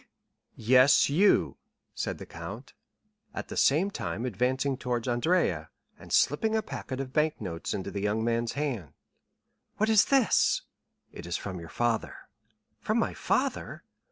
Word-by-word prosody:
"Yes, 130 +6 +5
you," 190 +8 +3 0.4
said - - -3
the - - -9
count, - - -9 0.6
at - - -5
the - - -6
same 170 +9 +3
time 95 - -4
advancing 130 +4 0
towards 120 -2 -3
Andrea, 120 - +1 0.3
and - - -13
slipping 220 - +2
a 220 - +1
packet 130 -2 -6
of 130 -1 -5
bank 155 0 +1
notes 85 -2 -5
into 95 -2 -4
the 100 - -4
young 105 +2 0
man's 115 0 0
hand. 130 - -3 0.8
"What 215 +1 +1
is 220 -2 +6
this?" 270 -4 +3 0.5
"It - - -9
is 85 - -1
from 95 -3 -6
your 85 0 -10
father." 120 -2 -1 0.6
"From 215 - -1
my 230 - 0
father?" - - -2
125 Hz, 150 wpm, -28 LUFS, 105-155 Hz, 0.8 s, is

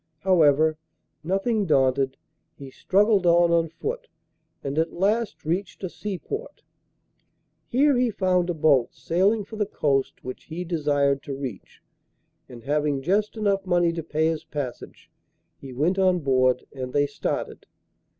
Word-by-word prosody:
However, 155 -4 +3 0.4
nothing 195 +4 0
daunted, 135 -2 +2 0.4
he 135 -1 -11
struggled 200 +3 +2
on 170 0 +5
on 165 -1 +2
foot, 475 - -5 0.6
and 140 +2 -2
at 165 +1 0
last 195 -4 -1
reached 185 +5 -3
a 185 - -2
seaport. 210 - -6 1.0
Here 280 +3 +3
he 250 0 +2
found 185 -4 +1
a 175 - -1
boat 145 -6 +2
sailing 190 - +1
for 220 - -10
the 210 -2 0
coast 140 -8 -1
which 130 - -8
he 170 +2 -5
desired 145 -5 +1
to 140 -2 -6
reach, 130 -8 -8 0.7
and, 120 -2 -11
having 145 -1 0
just 205 +6 0
enough 200 -2 +1
money 175 -1 +2
to 165 - -3
pay 155 0 -1
his 160 -1 -1
passage, 140 -5 -7 0.5
he 135 - -10
went 160 +10 0
on 185 -2 +3
board 130 -2 +2
and 130 -2 -6
they 145 0 +3
started. - - -4
165 Hz, 145 wpm, -25 LUFS, 140-195 Hz, 1.0 s, on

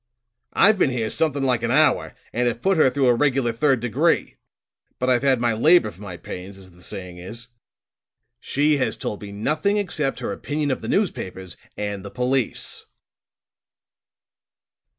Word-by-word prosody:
I've 210 0 +5
been 145 - +4
here 115 -4 -2
something 150 -4 0
like 125 -3 +1
an 115 - -1
hour 150 +5 +3 0.2
and 120 +1 +1
have 120 - -3
put 195 0 +3
her 155 - +5
through 135 +1 0
a 125 - +5
regular 135 -2 +1
third 130 +3 +2
degree; 120 -4 +1 0.6
but 125 0 +1
I've 120 - +3
had 135 -3 +3
my 120 -1 +1
labor 150 0 +4
for 90 - -17
my 95 -4 -7
pains, 95 +3 -8
as 95 -1 -14
the 90 +1 -19
saying 90 0 -8
is. 115 +6 -9 0.9
She 145 +2 +1
has 130 - -1
told 105 - -4
me 100 -1 -8
nothing 155 - 0
except 155 -9 -1
her - - -3
opinion 145 +7 -2
of 130 - -2
the - - -5
newspapers 95 - -2 0.2
and 100 -2 -4
the 100 - -7
police." 125 +1 -2
125 Hz, 170 wpm, -23 LUFS, 105-145 Hz, 0.9 s, I've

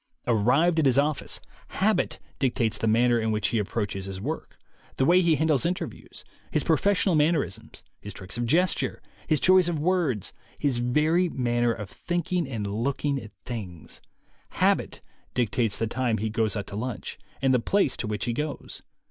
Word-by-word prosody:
Arrived 130 +10 +3
at 150 - +4
his 130 0 +3
office, 145 0 0 0.3
habit - - +1 0.2
dictates 115 -4 +1
the 115 - 0
manner 120 +2 +4
in 110 0 0
which 105 -1 +1
he 115 - 0
approaches 100 -2 -3
his 95 -1 -6
work, 150 +11 -5 0.4
the 130 - +3
way 180 +5 +5
he 170 -3 +3
handles 155 -4 +2
interviews, 180 +2 -4 0.2
his - - +1
pro - - +3
fessional 200 -3 +2
mannerisms, 155 +2 0 0.2
his 105 - -8
tricks 95 0 -4
of 120 0 -1
gesture, 180 +8 +1 0.3
his 155 -2 +2
choice 185 +1 +5
of 170 - -1
words, 155 - 0 0.2
his 135 -4 0
very 155 +8 +2
manner 120 -3 +1
of 105 -3 -5
thinking 175 - -2
and 110 -5 -3
way 100 - -3
of 105 - -3
looking 140 +2 -1
at 110 - -11
things. 100 -10 -7 0.5
Habit - - +1 0.3
dictates 115 -3 +1
the 115 - 0
time 120 0 0
he 110 +1 -2
goes 110 0 0
out 100 -2 -3
to 100 - -8
lunch, 120 +2 -5 0.2
and 135 0 +2
the 125 - +4
place 195 - +1
to 115 - -3
which 105 -2 -2
he 120 - -1
goes. 150 +4 -5
125 Hz, 180 wpm, -26 LUFS, 110-155 Hz, 0.5 s, way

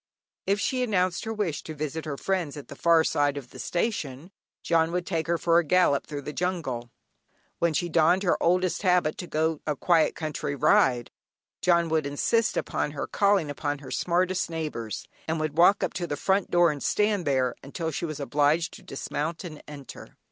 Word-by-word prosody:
If 200 +1 +2
she 255 +5 0
announced 185 -5 0
her 225 - -3
wish 200 -8 -2
to 155 - -8
visit 155 +2 -4
her 145 -3 -4
friends 175 -6 -2
at 145 - -10
the - - -8
far 165 -1 +4
side 145 -2 +1
of 130 -3 -8
the - - -11
station, 170 - -3 0.3
"John" 165 -1 +2
would 180 -1 -1
take 165 -4 -2
her 170 0 +1
for 170 0 +3
a - - +1
gallop 165 -3 +2
through 145 -2 -5
the 150 - -6
jungle; 160 -10 -2 0.7
when 170 -2 +1
she 175 - 0
donned 170 +3 +3
her 175 - +3
oldest 180 +1 +2
habit 180 -5 +2
to 175 - -5
go 160 -1 0
a 150 - 0
quiet 160 +1 +2
country 150 -2 -3
ride 125 -2 +3 0.5
"John" 170 -1 +3
would 155 -2 +1
insist 225 +11 +1
upon 150 - -2
her 145 - -3
calling 200 -7 +2
upon 145 0 -2
her 140 -2 -11
smartest 180 +1 0
neighbours, 150 -9 -4 0.2
and 160 0 -1
would 155 -1 -2
walk 175 +4 +5
up - - -1
to 175 -1 -3
the 145 - -3
front 190 +5 +1
door 175 -1 +4
and 145 -2 -6
stand 210 -5 +1
there 130 -3 +2
until 160 +4 -4
she 160 - -3
was 155 -2 -5
obliged 145 +4 +1
to - - -11
dismount 155 +4 -4
and 155 -4 -8
enter. 145 -2 -11
160 Hz, 200 wpm, -26 LUFS, 145-180 Hz, 0.7 s, walk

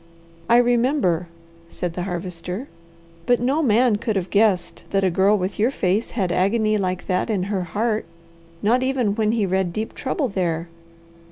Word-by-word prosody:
"I 235 - +6
remember," 240 - +2 0.4
said 175 -1 -4
the 180 - -4
Harvester. 180 +5 -4 0.6
"But 245 -1 +4
no 265 +6 +1
man 240 -4 +3
could 215 +1 -2
have 190 -2 -2
guessed 200 -3 +1
that 195 0 +1
a 185 - +2
girl 195 +4 +3
with 185 +2 -3
your 225 +4 +3
face 205 -4 0
had 185 -5 +1
agony 215 +4 +2
like 185 -2 -2
that 185 +4 -1
in 200 -4 0
her 190 - 0
heart, 215 +5 -1 0.6
not 235 +5 +3
even 255 -5 +1
when 215 0 +1
he 220 -3 +1
read 190 -1 0
deep 215 +5 -4
trouble 295 -7 -2
there." 170 -5 -2
205 Hz, 170 wpm, -22 LUFS, 180-235 Hz, 0.6 s, I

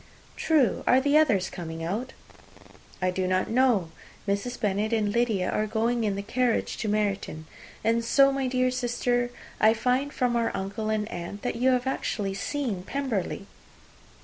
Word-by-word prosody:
"True. 305 -6 +2
Are 255 - +6
the 285 +2 +2
others 225 -12 +3
coming 165 -2 -6
out?" 215 +10 -3 0.9
"I 185 - +2
do 185 0 -1
not 185 +3 0
know. 230 -9 +3 0.4
Mrs. 200 +5 -2
Bennet 210 0 0
and 215 -3 +1
Lydia 225 -6 +1
are 215 - 0
going 230 +2 0
in 205 -2 0
the 200 - -4
carriage 240 +2 0
to 220 - -3
Meryton. 200 -6 -1 0.4
And 230 +1 +2
so, 275 +4 +5
my 270 -1 -1
dear 255 0 +1
sister, 245 -1 0 0.3
I 220 +1 +5
find, 255 +5 0
from 250 -4 0
our 230 -1 +2
uncle 200 +3 -3
and 215 -1 0
aunt, 175 +3 -6
that - - -2
you 255 +2 +3
have 250 -1 +2
actually 210 -6 -2
seen 225 -1 -2
Pemberley." 220 -4 -3
225 Hz, 165 wpm, -27 LUFS, 200-250 Hz, 0.9 s, Are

